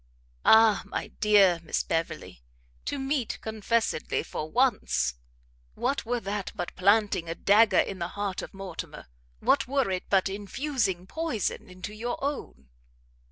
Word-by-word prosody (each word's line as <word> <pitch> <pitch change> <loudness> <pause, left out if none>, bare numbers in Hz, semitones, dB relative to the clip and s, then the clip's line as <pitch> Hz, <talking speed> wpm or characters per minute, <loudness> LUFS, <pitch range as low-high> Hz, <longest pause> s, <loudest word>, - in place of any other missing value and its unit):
"Ah, 220 -2 +7
my - - -4
dear 200 -5 +5
Miss 170 - -1
Beverley! 165 - -3 0.4
to 285 - -2
meet 270 -3 -2
confessedly 220 -4 -1
for 155 - -5
once, 245 - +1 0.6
what 255 -1 -1
were 245 0 0
that 200 -2 -4
but 175 - -5
planting 200 -3 +2
a 165 - -3
dagger 210 +5 +4
in 195 - +1
the 170 - -2
heart 200 -2 -2
of - - -8
Mortimer? 195 -1 -7 0.4
What - - +3
were 270 -5 +1
it 185 -1 -2
but 195 -1 +3
infusing 200 -1 -2
poison 300 - -3
into 185 +3 -8
your 235 +3 -3
own? 70 - -4
205 Hz, 140 wpm, -27 LUFS, 185-240 Hz, 0.6 s, Ah